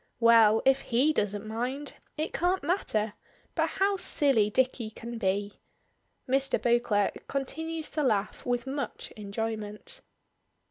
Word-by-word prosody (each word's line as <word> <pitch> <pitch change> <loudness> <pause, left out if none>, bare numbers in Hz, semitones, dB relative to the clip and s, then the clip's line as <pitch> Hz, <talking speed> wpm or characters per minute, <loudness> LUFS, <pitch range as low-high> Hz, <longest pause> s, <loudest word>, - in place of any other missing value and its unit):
Well, 225 -2 +6
if 270 0 +4
he 265 +6 +2
doesn't 205 -5 -1
mind, 250 +6 -3 0.2
it 310 - -2
can't 360 0 0
matter, 225 - 0 0.4
but - - +1
how 395 +1 +1
silly 275 - +3
Dicky 250 -1 0
can 230 +2 -8
be! 200 +1 -1 0.7
Mr. 270 +1 +2
Beauclerk 235 -4 +1
continues 320 +4 -4
to 305 - -1
laugh 215 -7 0
with 245 -1 -1
much 270 -3 -5
enjoyment. 215 - -5
240 Hz, 125 wpm, -28 LUFS, 215-285 Hz, 0.7 s, Well